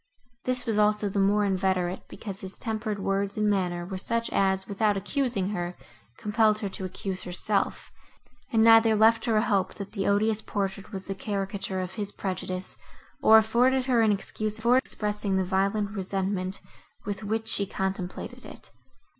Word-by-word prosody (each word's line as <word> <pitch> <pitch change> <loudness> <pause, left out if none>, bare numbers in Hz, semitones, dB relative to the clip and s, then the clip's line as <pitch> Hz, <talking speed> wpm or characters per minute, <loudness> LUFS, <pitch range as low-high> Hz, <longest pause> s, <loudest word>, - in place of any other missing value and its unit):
This 255 -1 0
was 220 -3 0
also 210 0 +2
the 200 - -1
more 205 +1 +3
inveterate, 185 -1 0
because 195 -3 -8
his 190 0 -5
tempered 220 -2 -3
words 195 +1 -1
and 210 0 +2
manner 180 -4 0
were 190 +1 -5
such 230 +4 -1
as, 190 -1 +1
without 205 0 +1
accusing 205 -2 -1
her, 175 -3 -4 0.4
compelled 215 0 +2
her 205 -2 -3
to 190 0 -6
accuse 185 0 -5
herself, 190 +3 0 0.6
and 225 -2 +4
neither 225 -1 +7
left 225 +1 +4
her 225 -2 +2
a 215 - +3
hope, 200 -5 0
that 200 -2 -7
the 195 -3 -2
odious 215 +2 +2
portrait 200 -1 -4
was 190 -2 -6
the 195 - -3
caricature 195 -1 -3
of 185 0 -4
his 205 -1 -2
prejudice, 185 -1 -4 0.4
or 220 - +8
afforded 245 +4 +3
her 250 -3 +3
an 220 -1 +4
excuse 210 +1 -2
for 235 +3 +3
expressing 210 -6 -1
the 190 - +1
violent 200 +2 0
resentment, 190 -1 -2 0.4
with 205 +1 -4
which 220 +2 -2
she 200 -2 +2
contemplated 190 -1 -4
it. - - -11
200 Hz, 170 wpm, -27 LUFS, 190-220 Hz, 0.6 s, or